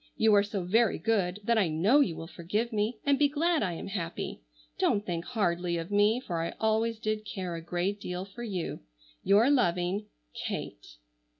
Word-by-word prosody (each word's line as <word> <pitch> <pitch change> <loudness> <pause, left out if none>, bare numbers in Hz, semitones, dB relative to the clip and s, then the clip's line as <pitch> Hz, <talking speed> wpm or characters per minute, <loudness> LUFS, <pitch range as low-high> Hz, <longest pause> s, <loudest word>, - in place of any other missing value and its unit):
You 220 -1 +4
are 205 - +7
so 200 -2 -3
very 225 +6 +3
good 205 -3 0
that 230 +1 +3
I 195 - +3
know 180 - +3
you 180 - +2
will 165 - -7
forgive 205 +8 -3
me, 215 +2 0
and 280 -1 +3
be 290 - +5
glad 325 +3 +1
I 185 -4 0
am 165 - -6
happy. 175 - -4 0.4
Don't 205 0 +2
think 170 -2 -2
hardly 175 -6 0
of 165 +3 -5
me 205 +3 +4
for 175 -10 -3
I 165 - -3
always 220 +1 +1
did 215 -1 -2
care 185 -4 -5
a 165 - -5
great 180 +4 -2
deal 180 +1 -4
for 200 +5 -11
you. 195 -8 -3 0.4
"Your 220 +7 +5
loving 180 -4 +1 0.4
"KATE." - - -6
205 Hz, 190 wpm, -29 LUFS, 175-225 Hz, 0.4 s, are